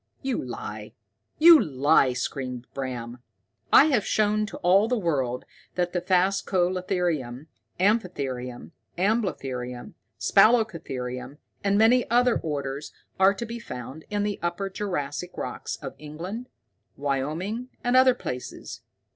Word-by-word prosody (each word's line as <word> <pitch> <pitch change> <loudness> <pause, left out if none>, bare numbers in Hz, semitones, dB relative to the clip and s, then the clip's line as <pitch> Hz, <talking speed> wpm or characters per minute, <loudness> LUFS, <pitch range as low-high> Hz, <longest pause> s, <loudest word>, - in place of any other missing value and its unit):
"You 265 -2 -1
lie! 110 -3 -7 0.4
You 330 -1 +9
lie!" 140 -2 +3
screamed 125 -1 -4
Bram. 125 -3 -5 0.5
"I - - +8
have 265 -9 +2
shown 215 0 +1
to - - -8
all 195 +4 +5
the 250 +1 +1
world 135 - -1 0.3
that 180 -1 -1
phascalotherium, 180 -6 0 0.3
amphitherium, 140 - -1 0.3
amblotherium, 140 - -2 0.3
spalacotherium, 165 - +2 0.3
and 200 0 +2
many 235 +3 +4
other 245 +1 +3
orders 140 -2 -4 0.3
are 195 +2 +5
to 235 - -4
be 235 +1 -6
found 130 - -8
in 205 -1 -1
the 205 -1 -2
Upper 175 +3 -2
Jurassic 180 -4 -4
rocks - - -4
of 135 -3 -8
England, 180 +11 -7 0.5
Wyoming, 155 - -2
and 245 +1 +1
other 255 -1 +6
places. 125 - -6
175 Hz, 115 wpm, -26 LUFS, 135-210 Hz, 0.5 s, You